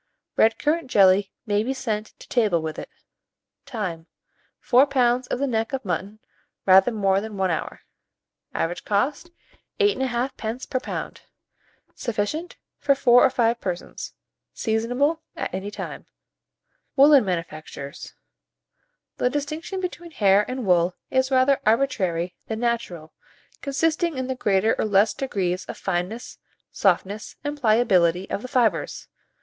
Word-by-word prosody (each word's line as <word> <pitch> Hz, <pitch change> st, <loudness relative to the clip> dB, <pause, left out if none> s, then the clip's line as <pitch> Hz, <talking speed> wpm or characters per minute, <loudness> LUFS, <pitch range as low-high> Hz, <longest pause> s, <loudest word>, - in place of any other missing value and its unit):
Red 225 Hz, 0 st, +4 dB
currant 310 Hz, -1 st, 0 dB
jelly 195 Hz, -2 st, +4 dB
may 205 Hz, -2 st, +1 dB
be 260 Hz, +5 st, -2 dB
sent 220 Hz, -5 st, -4 dB
to -, -, -13 dB
table 215 Hz, -8 st, +2 dB
with 160 Hz, -1 st, -5 dB
it. -, -, -8 dB, 0.8 s
Time. 180 Hz, -8 st, -4 dB, 0.5 s
4 260 Hz, +3 st, +4 dB
lbs. 250 Hz, -2 st, +2 dB
of -, -, -2 dB
the 280 Hz, -, 0 dB
neck 225 Hz, -2 st, -1 dB
of 265 Hz, -4 st, -3 dB
mutton, 195 Hz, +3 st, -3 dB, 0.5 s
rather 190 Hz, +3 st, +6 dB
more 195 Hz, -3 st, +1 dB
than 215 Hz, -1 st, -7 dB
1 190 Hz, -2 st, +1 dB
hour. 165 Hz, -, -4 dB, 0.7 s
Average 170 Hz, +2 st, -2 dB
cost, 270 Hz, +11 st, 0 dB, 0.5 s
8 410 Hz, -6 st, +3 dB
1/2d. 255 Hz, 0 st, -1 dB, 0.3 s
per 255 Hz, -, +1 dB
lb. -, -, -5 dB, 0.7 s
Sufficient 240 Hz, +10 st, -3 dB, 0.2 s
for 280 Hz, -1 st, +3 dB
4 245 Hz, -3 st, +5 dB
or -, -, +6 dB
5 235 Hz, 0 st, +1 dB
persons. 180 Hz, -2 st, -5 dB, 0.4 s
Seasonable 245 Hz, +8 st, 0 dB
at -, -, -4 dB
any 190 Hz, +2 st, -3 dB
time. 205 Hz, -, -7 dB, 0.9 s
WOOLLEN 280 Hz, -1 st, +7 dB
MANUFACTURES. 155 Hz, -5 st, -6 dB, 1.0 s
The 250 Hz, -, +2 dB
distinction 305 Hz, +7 st, -4 dB
between 350 Hz, -2 st, -5 dB
hair 205 Hz, -7 st, +3 dB
and 255 Hz, -2 st, -4 dB
wool 180 Hz, -1 st, +3 dB, 0.2 s
is 260 Hz, 0 st, +2 dB
rather 265 Hz, +1 st, +3 dB
arbitrary 195 Hz, -8 st, +1 dB
than 220 Hz, 0 st, -3 dB
natural, 225 Hz, -10 st, -2 dB, 0.5 s
consisting 315 Hz, +2 st, 0 dB
in 260 Hz, -, -2 dB
the 260 Hz, -, -2 dB
greater 210 Hz, -3 st, +2 dB
or -, -, +1 dB
less 205 Hz, +1 st, +3 dB
degrees 190 Hz, -8 st, -2 dB
of -, -, -7 dB
fineness, 190 Hz, +5 st, -3 dB, 0.3 s
softness 200 Hz, +2 st, 0 dB
and 290 Hz, 0 st, -4 dB
pliability 195 Hz, -6 st, +3 dB
of -, -, -2 dB
the 255 Hz, -, -6 dB
fibres. 235 Hz, -, 0 dB
225 Hz, 135 wpm, -24 LUFS, 190-265 Hz, 1.0 s, WOOLLEN